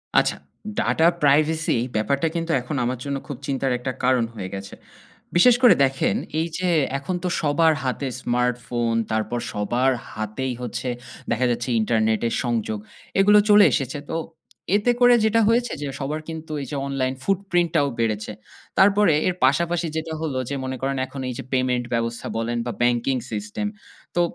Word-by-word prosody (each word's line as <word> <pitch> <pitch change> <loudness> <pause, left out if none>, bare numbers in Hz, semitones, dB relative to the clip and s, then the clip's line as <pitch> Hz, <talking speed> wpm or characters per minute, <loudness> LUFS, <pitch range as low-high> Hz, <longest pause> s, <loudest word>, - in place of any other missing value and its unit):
আচ্ছা। - - +3 0.4
Data 160 - +2 0.2
privacy 155 0 +3 0.2
ব্যাপারটা 140 +8 +1
কিন্তু 165 0 -1
এখন 130 +5 -5
আমার 125 +1 -1
জন্য 140 -1 -2
খুব 140 - -5
চিন্তার 135 -1 0
একটা 130 +1 -3
কারণ 125 -1 +3
হয়ে 95 -3 -5
গেছে। 100 0 -8 0.6
বিশেষ 235 +8 +7
করে 245 - +8
দেখেন 135 0 0 0.2
এই 165 - 0
যে 180 0 0 0.3
এখন 145 +7 -3
তো - - 0
সবার 160 +2 +3
হাতে 130 +2 -2
smartphone 120 -1 0
তারপর 110 +2 -1
সবার 120 +6 +1 0.2
হাতেই 110 +5 -3
হচ্ছে 125 +1 -4 0.4
দেখা 120 +2 +1
যাচ্ছে 120 +1 -2
internet 110 0 +1
এর 115 - -1
সংযোগ। 110 -3 -1 0.4
এগুলো 205 +2 +7
চলে 210 0 +8
এসেছে। 135 -1 -1
তো - - -2 0.6
এতে 210 +4 +3
করে 245 0 +7
যেটা 225 +1 +3
হয়েছে 240 +1 +2
যে 145 - -3
সবার 145 +3 -2
কিন্তু 160 -1 -7
এই 135 - -6
যে - - -3
online 135 -1 -1
footprint 180 -4 0
ও - - +2
বেড়েছে। 110 -2 -1 0.5
তারপরে 200 -2 +5
এর 180 - 0
পাশাপাশি 170 +5 +1
যেটা 160 0 -4
হলো 150 -5 -2
যে 140 - -2
মনে 130 0 -4
করেন 135 0 -1
এখন 135 - -7
এই - - -3
যে - - -4
payment 125 -1 +1
ব্যবস্থা 115 0 -2
বলেন 115 +1 -1
বা 120 - -2
banking 120 +2 +1
system 105 - -3 0.5
তো 175 - +3
135 Hz, 170 wpm, -23 LUFS, 120-165 Hz, 0.6 s, করে